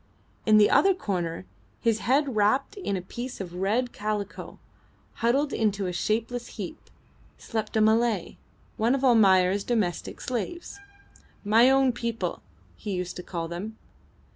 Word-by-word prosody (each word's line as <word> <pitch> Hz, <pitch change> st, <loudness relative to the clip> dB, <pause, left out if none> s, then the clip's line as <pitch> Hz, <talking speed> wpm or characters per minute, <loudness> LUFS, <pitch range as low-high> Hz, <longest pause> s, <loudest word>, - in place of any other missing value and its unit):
In 215 Hz, -1 st, +7 dB
the 210 Hz, -1 st, +5 dB
other 390 Hz, -1 st, +5 dB
corner, 175 Hz, -, -3 dB, 0.3 s
his 225 Hz, -1 st, +1 dB
head 270 Hz, +1 st, +1 dB
wrapped 215 Hz, +6 st, +2 dB
in 360 Hz, -, -2 dB
a 180 Hz, -, -6 dB
piece 240 Hz, +7 st, -7 dB
of 180 Hz, -3 st, -6 dB
red 215 Hz, +7 st, 0 dB
calico, 210 Hz, -1 st, -4 dB, 0.6 s
huddled 275 Hz, +5 st, +2 dB
into 205 Hz, -3 st, 0 dB
a 180 Hz, -, -2 dB
shapeless 225 Hz, +6 st, -2 dB
heap, -, -, -7 dB, 0.5 s
slept 220 Hz, -1 st, -3 dB
a -, -, +4 dB
Malay, 220 Hz, -3 st, +2 dB, 0.4 s
one 230 Hz, +4 st, +2 dB
of 275 Hz, -, -3 dB
Almayer's 195 Hz, -5 st, +4 dB
domestic 210 Hz, -8 st, -2 dB
slaves 340 Hz, -, -4 dB, 0.7 s
"my 225 Hz, +5 st, +6 dB
own 270 Hz, -1 st, +4 dB
people," 235 Hz, -1 st, -3 dB, 0.3 s
he 205 Hz, -, -5 dB
used 180 Hz, 0 st, -4 dB
to -, -, -5 dB
call 170 Hz, -2 st, -4 dB
them. 195 Hz, +6 st, -6 dB
220 Hz, 140 wpm, -26 LUFS, 195-245 Hz, 0.7 s, In